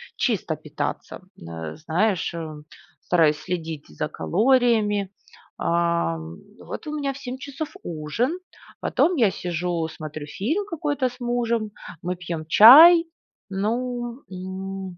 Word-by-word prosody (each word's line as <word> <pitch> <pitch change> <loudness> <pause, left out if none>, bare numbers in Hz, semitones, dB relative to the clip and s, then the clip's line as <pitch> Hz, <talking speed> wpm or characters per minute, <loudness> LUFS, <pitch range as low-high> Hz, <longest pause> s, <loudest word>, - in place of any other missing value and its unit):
чисто - - -1
питаться, - - -5 0.2
н 85 - -10 0.2
э, - - -13
знаешь, 170 +4 0
э, 155 -3 -6 0.4
стараюсь 160 -4 +3
следить 165 -5 -5
за 150 - -4
калориями, 215 -2 +2 0.5
ам. 170 - -1 0.2
Вот 315 - -8
у 300 - -3
меня 280 -2 -1
в - - -10
7:00 255 -1 -6
часов 285 +2 -6
ужин, 175 - -2 0.4
потом 355 +1 +2
я 225 -8 +3
сижу 175 -2 -2
смотрю 155 -1 -7
фильм 310 - -2
какой-то 295 -5 -1
с 250 +1 -15
мужем, 235 -3 -1 0.3
мы 180 +1 -2
пьем 170 -3 -5
чай, 315 - +9 0.4
ну, 240 +5 -3
м, 190 0 -6
195 Hz, 125 wpm, -24 LUFS, 165-250 Hz, 0.5 s, чай